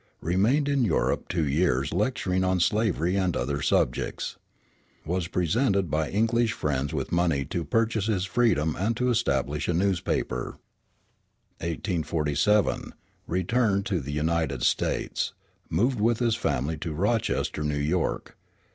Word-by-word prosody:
Remained 110 - +2
in 140 -3 +2
Europe 95 -8 0
two 80 -4 0
years, 70 -2 +1
lecturing 95 -2 0
on 95 0 +1
slavery 95 -2 +1
and 95 -4 +1
other 70 +4 -2
subjects. - - 0 0.7
Was 90 +1 -1
presented 95 - +1
by 75 -1 0
English 115 +2 +1
friends 70 -1 -1
with - - -3
money 85 -5 +1
to 85 - -3
purchase 115 +1 0
his 95 -4 0
freedom 95 -9 +1
and 110 +4 0
to 125 0 +1
establish 70 - 0
a 85 - +1
newspaper. 95 -1 -1 1.0
1847 85 +2 0 0.3
Returned 100 +3 +1
to 95 -6 0
the 70 0 -6
United 75 -3 -1
States. - - 0 0.4
Moved 120 +9 +1
with 115 +2 +2
his 115 -2 +1
family 75 - -1
to 80 +1 -4
Rochester, 100 -2 0
New 75 -1 -1
York. 80 +5 -1
90 Hz, 130 wpm, -26 LUFS, 75-110 Hz, 1.0 s, Remained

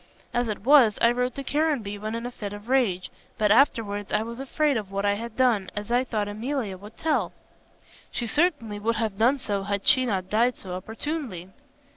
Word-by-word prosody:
As 245 -1 +1
it 210 -2 -4
was, 260 -7 +6
I 235 - +5
wrote 250 0 -1
to 275 - -4
Caranby 275 -10 0
when 215 +2 -4
in 230 +1 -4
a 245 - -4
fit 205 -4 -6
of 205 +3 -10
rage; 225 -9 +1 0.3
but 210 -1 +2
afterwards 215 -5 +2
I 210 +1 +2
was 235 +2 -7
afraid 285 +2 +1
of 205 -4 -3
what 200 +1 -1
I 200 - +3
had 225 +2 -6
done, 235 -7 +2
as 210 +2 -5
I 245 +1 +3
thought 215 -5 -2
Emilia 220 0 -3
would 205 +4 -13
tell." 315 -1 0 0.8
"She 240 - -3
certainly 235 - 0
would 230 +2 0
have 220 -3 -2
done 250 +5 +4
so 205 -7 -2
had 200 0 -3
she 255 -1 +5
not 190 -4 -1
died 235 +5 +2
so 185 -2 -6
opportunely." 220 - -5
225 Hz, 205 wpm, -26 LUFS, 205-255 Hz, 0.8 s, was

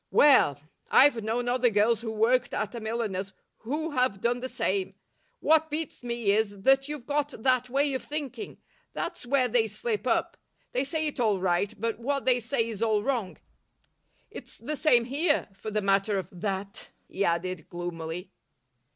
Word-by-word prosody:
Well, 260 - +5 0.3
I've 255 -5 +5
known 235 +3 -1
other 245 0 +3
girls 220 +2 +2
who 230 - -4
worked 225 +3 +2
at 215 +1 -2
a 235 - -5
milliner's 215 -4 -3 0.3
who 300 +7 -3
have 250 -7 +1
done 240 +3 0
the 260 +1 -5
same. 190 -4 -1 0.5
What 315 0 +4
beats 310 0 -3
me 235 -4 0
is 205 -2 0
that 270 +2 +4
you've 295 -4 -6
got 290 0 0
that 255 -1 +2
way 280 +2 +1
of 260 - -2
thinking. 300 - -6 0.4
That's - - -5
where 260 -1 +3
they 230 -1 +2
slip 425 - -3
up. - - 0 0.3
They 255 +2 0
say 315 +2 -1
it 295 -3 -3
all 215 -5 +2
right, 185 +2 +1
but 230 +1 -2
what 275 +3 -2
they 250 -1 +4
say 230 0 0
is 220 -2 -6
all 215 -2 +2
wrong. 235 -8 -2 0.9
It's - - -10
the 305 - -4
same 245 -6 +4
here, 290 +5 +1
for 195 +3 -7
the 210 -1 -1
matter 195 +1 +2
of 185 -2 -4
that," 195 +2 -4 0.2
he 200 - -2
added 170 -1 -1
gloomily. 175 0 -5
235 Hz, 175 wpm, -28 LUFS, 200-270 Hz, 0.9 s, Well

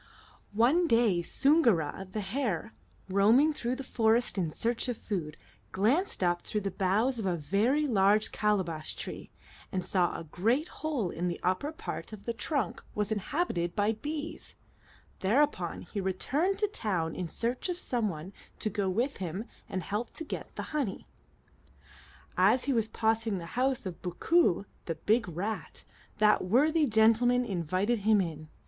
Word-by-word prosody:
One 280 +11 +4
day 230 - +3
Soongoo'ra, 200 - +2
the 215 - -2
hare, 220 - -2 0.3
roaming 220 +11 +4
through 245 -3 -2
the 275 - -6
forest 230 -1 +2
in 180 -5 0
search 230 +10 -1
of 245 -3 -2
food, 165 -8 -4 0.3
glanced 230 - +1
up 175 -1 +2
through 210 - -3
the 195 0 -2
boughs 215 +8 +1
of 205 - -2
a 180 - +1
very 215 - +1
large 210 -3 +3
calabash 185 -7 -1
tree, - - -7 0.4
and 185 -2 -2
saw 180 -2 +2
that - - -5
a - - -7
great 230 - 0
hole 275 - -2
in 175 +2 -2
the 175 - -3
upper 185 +12 0
part 315 -7 -6
of 210 - -9
the 235 - -1
trunk 245 - -2
was 210 0 -1
inhabited 205 - -1
by 210 0 +2
bees; 295 +7 -6 0.6
thereupon 205 - +1
he 200 +2 -4
returned 280 - 0
to 420 +1 +1
town 185 - -2
in 180 - -3
search 240 - -2
of 355 - -2
some 240 - 0
one 170 +3 -7 0.2
to 215 - -2
go 200 -1 0
with 240 +9 0
him 185 +4 -4 0.2
and 185 - -3
help 210 +7 -3
to 325 - -4
get 295 - -6
the - - -4
honey. 275 -10 -2 1.3
As 255 - +4
he 275 - +1
was 225 -3 +2
passing 225 -1 0
the 170 - -6
house 260 -1 +1
of 180 -3 -6
Boo'koo, 195 - +2 0.2
the 165 - -2
big 215 +5 +1
rat, 195 +7 -4 0.3
that 210 0 +4
worthy 295 - +3
gentleman 230 +3 +4
invited 190 +4 0
him 210 +1 +4
in. 155 -4 -3
215 Hz, 165 wpm, -30 LUFS, 185-250 Hz, 1.3 s, One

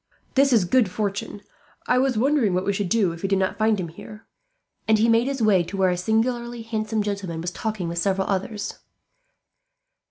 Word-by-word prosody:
"This 275 0 +4
is 220 -7 +4
good 235 +1 +3
fortune. 200 +1 -3 0.4
I 250 - +2
was 260 -3 +1
wondering 250 -6 +2
what 185 - -1
we 200 - +1
should 195 -2 -2
do, 205 -5 +2
if 165 0 -9
we 195 - -2
did 195 - +2
not 190 +2 -1
find 215 -1 +2
him 170 -3 -3
here;" 210 +6 -12 0.6
and 220 0 +4
he 220 +2 +3
made 230 +2 +3
his 270 -4 -2
way 200 -4 +4
to 185 +3 -6
where 190 -1 +3
a - - 0
singularly 235 +4 -1
handsome 220 -1 -2
gentleman 200 -5 -4
was 175 +2 -3
talking 215 -3 -3
with 170 0 -3
several 190 +1 0
others. 200 +2 -3
210 Hz, 200 wpm, -24 LUFS, 190-230 Hz, 0.6 s, This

